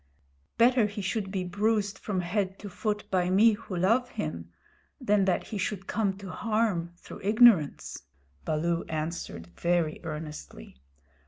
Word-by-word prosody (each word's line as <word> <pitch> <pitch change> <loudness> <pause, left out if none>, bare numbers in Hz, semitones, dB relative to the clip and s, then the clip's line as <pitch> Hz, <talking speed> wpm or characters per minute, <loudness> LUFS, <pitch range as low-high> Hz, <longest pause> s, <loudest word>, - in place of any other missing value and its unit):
"Better 240 -1 +5
he 210 +1 -7
should 195 +1 -2
be 190 -1 -2
bruised 205 +2 0
from 190 -4 -2
head 190 +2 -1
to 205 - -8
foot 210 +2 -2
by 180 -1 +2
me 210 +5 +6
who 205 -3 -6
love 230 +8 +2
him 85 +2 -5 0.5
than 205 -1 +2
that 185 - +1
he 210 - -5
should 195 +1 -2
come 200 -3 -1
to 195 -2 -8
harm 215 -7 0
through - - -11
ignorance," 210 -7 +4 0.4
Baloo 165 +2 0
answered 155 - -4
very 170 - 0
earnestly. 150 - -8
190 Hz, 145 wpm, -28 LUFS, 170-210 Hz, 0.5 s, me